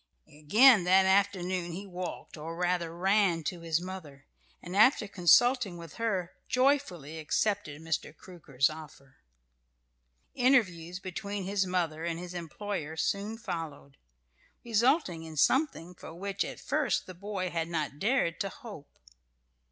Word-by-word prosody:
Again 210 Hz, -, +5 dB
that 190 Hz, +1 st, +5 dB
afternoon 185 Hz, -3 st, +1 dB
he 195 Hz, +4 st, -6 dB
walked 180 Hz, -1 st, -7 dB
or 165 Hz, +1 st, -7 dB
rather, 175 Hz, -1 st, 0 dB
ran 190 Hz, -3 st, +2 dB
to 175 Hz, +2 st, -4 dB
his 165 Hz, -1 st, 0 dB
mother, 170 Hz, -7 st, -9 dB, 0.3 s
and 180 Hz, +2 st, -8 dB
after 215 Hz, +1 st, +5 dB
consulting 200 Hz, -, +4 dB
with 165 Hz, -3 st, -10 dB
her, 190 Hz, -6 st, -1 dB, 0.2 s
joyfully 250 Hz, -, +1 dB
accepted 195 Hz, -1 st, -1 dB
Mr. 160 Hz, -2 st, -2 dB
Crooker's 150 Hz, -7 st, -1 dB
offer. 150 Hz, -4 st, -11 dB, 1.2 s
Interviews 180 Hz, -10 st, +2 dB
between 200 Hz, +2 st, -5 dB
his 195 Hz, 0 st, 0 dB
mother 165 Hz, -3 st, -1 dB
and 170 Hz, -1 st, -2 dB
his 180 Hz, 0 st, -7 dB
employer 170 Hz, -1 st, -5 dB
soon 205 Hz, +6 st, -1 dB
followed, 160 Hz, -9 st, -6 dB, 0.7 s
resulting 235 Hz, -, +2 dB
in 160 Hz, -1 st, -9 dB
something 215 Hz, -, +1 dB
for 165 Hz, -2 st, -11 dB
which 195 Hz, +2 st, -2 dB
at -, -, -7 dB
first 300 Hz, +2 st, 0 dB
the 185 Hz, -, -9 dB
boy 185 Hz, 0 st, -4 dB
had 165 Hz, -1 st, -2 dB
not 155 Hz, -4 st, -3 dB
dared 215 Hz, -6 st, +1 dB
to 195 Hz, -, -1 dB
hope. 215 Hz, -, -12 dB
180 Hz, 135 wpm, -30 LUFS, 165-205 Hz, 1.2 s, Again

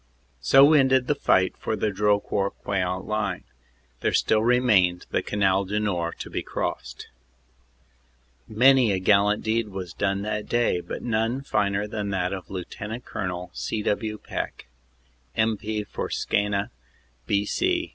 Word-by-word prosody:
"So 135 Hz, -, +6 dB
ended 130 Hz, -3 st, +4 dB
the 150 Hz, -, +2 dB
fight 95 Hz, -9 st, +2 dB
for 110 Hz, -, -3 dB
the 105 Hz, 0 st, -1 dB
Drocourt 100 Hz, 0 st, 0 dB
Queant 90 Hz, -2 st, -1 dB
line. 105 Hz, -1 st, -2 dB, 0.6 s
There -, -, 0 dB
still 110 Hz, -, +3 dB
remained 110 Hz, -7 st, +3 dB
the -, -, +1 dB
Canal 100 Hz, -1 st, +1 dB
du 105 Hz, +3 st, -1 dB
Nord 90 Hz, -5 st, -2 dB
to -, -, -7 dB
be -, -, -2 dB
crossed." -, -, -5 dB, 1.4 s
Many 125 Hz, +1 st, +5 dB
a 95 Hz, -, +1 dB
gallant 105 Hz, +2 st, +3 dB
deed 110 Hz, 0 st, 0 dB
was 95 Hz, -4 st, -7 dB
done 100 Hz, -1 st, -1 dB
that 105 Hz, 0 st, -3 dB
day, 120 Hz, -6 st, +2 dB
but -, -, -7 dB
none 115 Hz, +3 st, -1 dB
finer 100 Hz, -5 st, 0 dB
than 105 Hz, -1 st, -4 dB
that 95 Hz, -1 st, -1 dB
of 95 Hz, -4 st, -7 dB
Lt. 90 Hz, -2 st, -6 dB, 0.3 s
Col. 90 Hz, -1 st, -4 dB
C. 110 Hz, -1 st, -3 dB
W. 110 Hz, +1 st, -1 dB
Peck, -, -, -6 dB, 0.7 s
M.P. 110 Hz, -1 st, 0 dB
for -, -, -5 dB
Skeena, 100 Hz, 0 st, -1 dB, 0.6 s
B.C. 335 Hz, -, 0 dB
105 Hz, 140 wpm, -25 LUFS, 95-110 Hz, 1.4 s, So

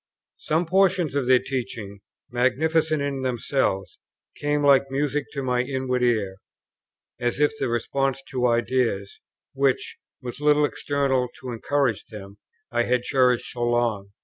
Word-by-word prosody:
Some 160 Hz, +3 st, 0 dB
portions 180 Hz, -3 st, +2 dB
of 140 Hz, -3 st, -1 dB
their 130 Hz, 0 st, +7 dB
teaching, 120 Hz, -6 st, -5 dB, 0.3 s
magnificent 155 Hz, +5 st, +1 dB
in 140 Hz, -1 st, -2 dB
themselves, 120 Hz, -6 st, -1 dB, 0.4 s
came 145 Hz, 0 st, 0 dB
like 140 Hz, -1 st, +5 dB
music 145 Hz, +1 st, -1 dB
to 140 Hz, -2 st, -3 dB
my 125 Hz, -1 st, +1 dB
inward 130 Hz, -1 st, -2 dB
ear, 110 Hz, -6 st, +1 dB, 0.8 s
as 120 Hz, +1 st, -1 dB
if 150 Hz, 0 st, +4 dB
the -, -, 0 dB
response 135 Hz, +3 st, -1 dB
to 125 Hz, -1 st, +1 dB
ideas, 120 Hz, -4 st, 0 dB, 0.3 s
which, 135 Hz, -1 st, 0 dB, 0.2 s
with 125 Hz, +1 st, -7 dB
little 150 Hz, 0 st, +4 dB
external 140 Hz, -3 st, 0 dB
to 130 Hz, -1 st, -5 dB
encourage 120 Hz, -1 st, 0 dB
them, 100 Hz, -1 st, -11 dB, 0.3 s
I 120 Hz, -1 st, +2 dB
had 125 Hz, 0 st, +1 dB
cherished 125 Hz, -2 st, +2 dB
so 120 Hz, -, -6 dB
long. 120 Hz, -4 st, 0 dB
130 Hz, 140 wpm, -24 LUFS, 120-140 Hz, 0.8 s, their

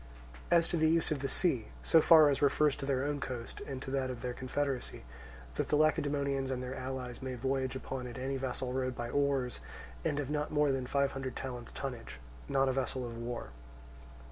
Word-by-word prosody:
As 170 Hz, -1 st, +5 dB
to 175 Hz, -, 0 dB
the 160 Hz, 0 st, +4 dB
use 165 Hz, 0 st, +2 dB
of 150 Hz, -, 0 dB
the 135 Hz, -, -1 dB
sea, 135 Hz, -, +1 dB, 0.2 s
so 165 Hz, -, +6 dB
far 155 Hz, -2 st, +8 dB
as 140 Hz, -, -1 dB
refers 145 Hz, 0 st, +4 dB
to 135 Hz, -, -5 dB
their 135 Hz, -1 st, +1 dB
own 145 Hz, 0 st, -1 dB
coast 125 Hz, -3 st, -5 dB
and 135 Hz, -2 st, -4 dB
to 130 Hz, -, -5 dB
that 135 Hz, -1 st, 0 dB
of 125 Hz, -1 st, -6 dB
their 125 Hz, -1 st, -2 dB
confederacy, 130 Hz, -, -2 dB, 0.5 s
that -, -, -1 dB
the -, -, +2 dB
Lacedaemonians 140 Hz, -3 st, +2 dB
and 130 Hz, -1 st, -2 dB
their 125 Hz, +1 st, -4 dB
allies 130 Hz, -2 st, -5 dB
may 130 Hz, -1 st, -3 dB
voyage 130 Hz, +1 st, -1 dB
upon 130 Hz, -1 st, -4 dB
it 120 Hz, -, -7 dB
in 130 Hz, -, -4 dB
any 135 Hz, +1 st, -1 dB
vessel 130 Hz, -1 st, -3 dB
rowed 130 Hz, -1 st, -1 dB
by 120 Hz, 0 st, -4 dB
oars 140 Hz, -4 st, +1 dB, 0.4 s
and 145 Hz, -, 0 dB
of 145 Hz, 0 st, -2 dB
not 150 Hz, 0 st, 0 dB
more 150 Hz, -1 st, +3 dB
than 130 Hz, -2 st, -1 dB
five 140 Hz, +1 st, +2 dB
hundred 135 Hz, -2 st, -4 dB
talents 125 Hz, -2 st, -5 dB
tonnage, 125 Hz, -, -6 dB, 0.3 s
not 135 Hz, 0 st, +3 dB
a -, -, +3 dB
vessel 130 Hz, -1 st, -1 dB
of 120 Hz, -1 st, -6 dB
war. 115 Hz, -, -5 dB
135 Hz, 215 wpm, -33 LUFS, 125-145 Hz, 0.5 s, far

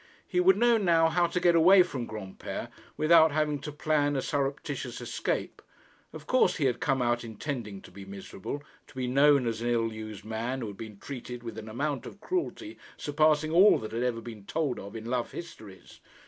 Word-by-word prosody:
He 360 Hz, -, 0 dB
would 375 Hz, +1 st, +5 dB
know 235 Hz, -1 st, +4 dB
now 165 Hz, -4 st, +4 dB
how 175 Hz, +1 st, +2 dB
to 170 Hz, +1 st, -1 dB
get 175 Hz, -1 st, +4 dB
away 180 Hz, +3 st, +7 dB
from 130 Hz, -9 st, -5 dB
Granpere 105 Hz, -3 st, -6 dB, 0.3 s
without 160 Hz, 0 st, +6 dB
having 150 Hz, -1 st, 0 dB
to 150 Hz, +2 st, -6 dB
plan 150 Hz, -1 st, +1 dB
a 135 Hz, -, -1 dB
surreptitious 140 Hz, -1 st, -3 dB
escape. -, -, -3 dB, 0.5 s
Of -, -, -10 dB
course 255 Hz, -8 st, +3 dB
he 150 Hz, -, 0 dB
had 125 Hz, -3 st, +1 dB
come 135 Hz, -5 st, +1 dB
out 120 Hz, 0 st, +1 dB
intending 110 Hz, -3 st, -5 dB
to -, -, -13 dB
be 100 Hz, +2 st, -10 dB
miserable, 100 Hz, +7 st, -7 dB, 0.2 s
to -, -, -18 dB
be 130 Hz, -1 st, -2 dB
known 140 Hz, +1 st, +4 dB
as 115 Hz, -1 st, -2 dB
an 120 Hz, -, -1 dB
ill 115 Hz, -2 st, +1 dB
used 110 Hz, -2 st, -8 dB
man 115 Hz, +4 st, -3 dB
who 115 Hz, -, -3 dB
had 100 Hz, -, -10 dB
been 110 Hz, -3 st, -9 dB
treated 125 Hz, -1 st, -7 dB
with 115 Hz, -2 st, -6 dB
an 110 Hz, 0 st, -9 dB
amount 140 Hz, +2 st, -2 dB
of -, -, -11 dB
cruelty 340 Hz, -, -3 dB, 0.2 s
surpassing 155 Hz, +1 st, +2 dB
all 185 Hz, +5 st, +7 dB
that 110 Hz, -, -6 dB
had 115 Hz, +1 st, -2 dB
ever 120 Hz, -2 st, -1 dB
been 110 Hz, -3 st, -9 dB
told 150 Hz, -6 st, -1 dB
of 100 Hz, +3 st, -9 dB
in 110 Hz, 0 st, -7 dB
love 120 Hz, 0 st, -2 dB
histories. 110 Hz, -, -10 dB
135 Hz, 205 wpm, -29 LUFS, 115-160 Hz, 0.5 s, away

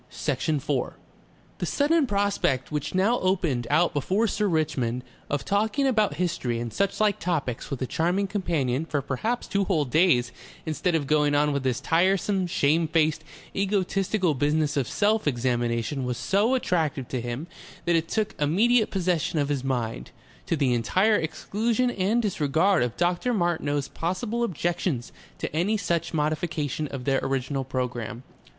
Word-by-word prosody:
Section 150 Hz, +1 st, -1 dB
4 140 Hz, -2 st, -2 dB, 0.6 s
The -, -, -1 dB
sudden 300 Hz, 0 st, +2 dB
prospect 200 Hz, -, 0 dB
which 150 Hz, +2 st, -3 dB
now 210 Hz, +6 st, +3 dB
opened 170 Hz, -11 st, 0 dB
out 175 Hz, +1 st, +3 dB
before 185 Hz, +9 st, +1 dB
Sir 210 Hz, -1 st, 0 dB
Richmond 140 Hz, -8 st, 0 dB, 0.3 s
of 145 Hz, -, -2 dB
talking 220 Hz, +7 st, +1 dB
about 215 Hz, -, +2 dB
history 155 Hz, -9 st, -1 dB
and 120 Hz, -1 st, -4 dB
suchlike 200 Hz, -, +1 dB
topics 150 Hz, -9 st, -2 dB
with 135 Hz, -2 st, -3 dB
a -, -, 0 dB
charming 175 Hz, +8 st, 0 dB
companion 160 Hz, -9 st, -1 dB
for 145 Hz, -4 st, -2 dB
perhaps 220 Hz, -, -2 dB
two 200 Hz, 0 st, 0 dB
whole 160 Hz, -7 st, +1 dB
days 130 Hz, -4 st, +3 dB, 0.3 s
instead 165 Hz, +2 st, 0 dB
of 155 Hz, -3 st, 0 dB
going 150 Hz, 0 st, +2 dB
on 145 Hz, 0 st, +3 dB
with 140 Hz, -, 0 dB
this 130 Hz, 0 st, 0 dB
tiresome, 185 Hz, +5 st, +2 dB
shamefaced, 160 Hz, 0 st, +2 dB, 0.3 s
egotistical 195 Hz, -2 st, +1 dB
business 150 Hz, +2 st, +1 dB
of 135 Hz, -4 st, 0 dB
self 215 Hz, -2 st, +1 dB
examination 120 Hz, 0 st, 0 dB
was 125 Hz, -1 st, -2 dB
so 205 Hz, -, +2 dB
attractive 160 Hz, -, 0 dB
to 125 Hz, -, -2 dB
him 120 Hz, +5 st, -4 dB, 0.4 s
that 170 Hz, -1 st, +3 dB
it 165 Hz, 0 st, +1 dB
took 215 Hz, -2 st, -1 dB
immediate 215 Hz, +10 st, +3 dB
possession 180 Hz, -3 st, 0 dB
of 145 Hz, -1 st, +1 dB
his 140 Hz, -3 st, -1 dB
mind, 115 Hz, -, -2 dB, 0.4 s
to -, -, +1 dB
the 135 Hz, -5 st, +2 dB
entire 185 Hz, -, +3 dB
exclusion 225 Hz, +9 st, -1 dB
and 215 Hz, +3 st, +1 dB
disregard 170 Hz, 0 st, +2 dB
of 125 Hz, -1 st, -1 dB
Dr. 175 Hz, +8 st, +1 dB
Martineau's 155 Hz, -6 st, 0 dB
possible 210 Hz, +8 st, -2 dB
objections 170 Hz, -, -1 dB, 0.3 s
to -, -, -5 dB
any 195 Hz, +7 st, +1 dB
such 170 Hz, -4 st, -1 dB
modification 155 Hz, -1 st, -1 dB
of 135 Hz, -2 st, -6 dB
their 135 Hz, 0 st, +2 dB
original 135 Hz, 0 st, -1 dB
programme. 125 Hz, -2 st, -4 dB
160 Hz, 155 wpm, -26 LUFS, 135-195 Hz, 0.6 s, now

